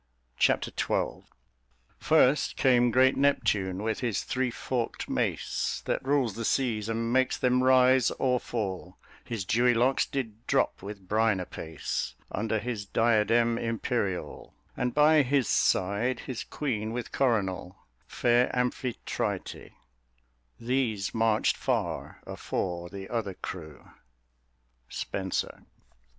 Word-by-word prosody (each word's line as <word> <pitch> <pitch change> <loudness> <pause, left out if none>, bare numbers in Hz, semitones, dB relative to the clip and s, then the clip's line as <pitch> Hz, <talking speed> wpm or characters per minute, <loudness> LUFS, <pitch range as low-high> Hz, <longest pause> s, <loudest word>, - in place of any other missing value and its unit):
Chapter - - +2
XII - - -1 0.7
First 135 +4 +3
came 125 -2 +4
great 130 +3 +4
Neptune, 100 -9 +1
with 110 -1 -1
his 115 -6 -1
three 130 0 -1
forkt 120 0 -3
mace, - - -2
That - - -1
rules 135 -5 +1
the 115 - -5
seas, 115 -4 0
and 115 +1 -1
makes 130 0 +2
them 125 0 +2
rise 130 -1 +5
or 125 -1 +2
fall: 95 -6 -4 0.3
His 110 -5 -4
dewy 120 +4 +3
locks 125 +4 +2
did 115 -5 -5
drop - - +1
with 100 -1 -9
brine 110 -1 +2
apace 80 -3 -4 0.2
Under 110 +2 -1
his 110 -2 -4
diademe 115 +1 +2
imperiall: 115 -4 -3 0.2
And 125 -1 -2
by 150 +1 +6
his 135 -3 +1
side 105 +7 +1
his 125 -3 -5
queene 110 -6 -3
with 125 0 -5
coronall, 95 -8 0 0.3
Fair 120 +1 +2
Amphitrite 125 0 -3 0.9
These 115 -5 -1
marched 110 -1 +2
farre - - -2
afore 85 -1 -4
the 95 +1 -8
other 110 -6 -3
crew. 80 -6 -8 1.0
SPENSER. 95 -2 -4
115 Hz, 115 wpm, -28 LUFS, 100-125 Hz, 1.0 s, by